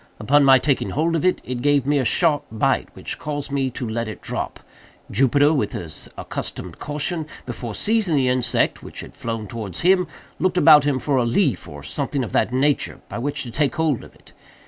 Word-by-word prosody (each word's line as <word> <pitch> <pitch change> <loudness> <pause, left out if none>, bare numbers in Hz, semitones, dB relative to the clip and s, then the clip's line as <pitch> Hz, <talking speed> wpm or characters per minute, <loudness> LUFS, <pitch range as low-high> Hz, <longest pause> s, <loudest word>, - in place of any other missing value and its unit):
Upon 145 +1 +4
my 135 -1 +7
taking 135 +1 0
hold 165 +3 0
of 165 - 0
it, 185 0 +2
it 125 -1 -4
gave 145 -1 +3
me 145 0 +2
a - - +1
sharp 150 +5 +2
bite, 110 - +1
which - - -6
caused 145 -1 -4
me 135 -2 0
to 125 -1 -5
let 115 +1 -2
it 105 -4 -7
drop. - - -4 0.5
Jupiter, 145 +3 +4
with 105 -9 0
his 80 -3 -6
accustomed - - -5
caution, 150 +2 -3 0.2
before 120 -2 -6
seizing 215 -7 +2
the 135 -2 +2
insect, 125 -1 +1
which - - -8
had - - -11
flown 115 -2 -4
towards 105 -4 -5
him, 180 0 +4 0.3
looked 185 -1 +1
about 150 -5 +7
him 145 -3 +2
for 135 +2 0
a 125 - +3
leaf, 130 - +1
or 70 -1 -10
something 135 - -2
of 110 - -5
that - - +1
nature, 140 +3 +1
by - - -5
which 140 +4 -2
to 120 - -7
take 145 +4 0
hold 155 -5 0
of - - -15
it. - - -21
135 Hz, 210 wpm, -22 LUFS, 120-150 Hz, 0.5 s, my